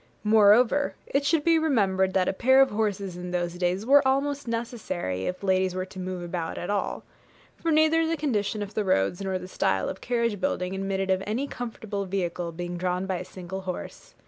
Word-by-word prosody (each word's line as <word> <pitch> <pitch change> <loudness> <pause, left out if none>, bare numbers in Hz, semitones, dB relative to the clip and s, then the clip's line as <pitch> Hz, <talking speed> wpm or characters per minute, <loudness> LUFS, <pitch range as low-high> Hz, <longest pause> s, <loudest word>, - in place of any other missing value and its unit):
Moreover, 220 +6 +5
it 280 +1 0
should 320 -2 +2
be 330 0 +4
remembered 195 -11 +1
that 185 -1 +3
a - - +1
pair 260 +7 +4
of 270 0 +5
horses 200 -3 -1
in 180 0 -6
those 175 -1 -1
days 180 +3 0
were 280 +3 +7
almost 275 +1 0
necessary, 215 - -3
if 180 +2 -4
ladies 185 -1 +1
were 185 0 -2
to 190 0 -11
move 185 -1 -4
about 170 -1 -4
at 175 - -3
all; 205 - -2 0.5
for 335 - -3
neither 315 +1 +4
the 330 0 0
condition 215 -7 -1
of 205 +1 -8
the 215 - 0
roads 175 - +1
nor 190 -1 -1
the 180 0 -8
style 95 - 0
of - - -7
carriage 235 -4 0
building 180 0 -1
admitted 195 0 -1
of 190 0 +2
any 245 +7 -1
comfortable 220 -6 -5
vehicle 175 -2 -2
being 175 +1 -5
drawn 180 +1 -1
by 190 -1 -1
a - - -5
single 190 +1 -7
horse. 185 -1 -7
195 Hz, 200 wpm, -26 LUFS, 180-240 Hz, 0.5 s, were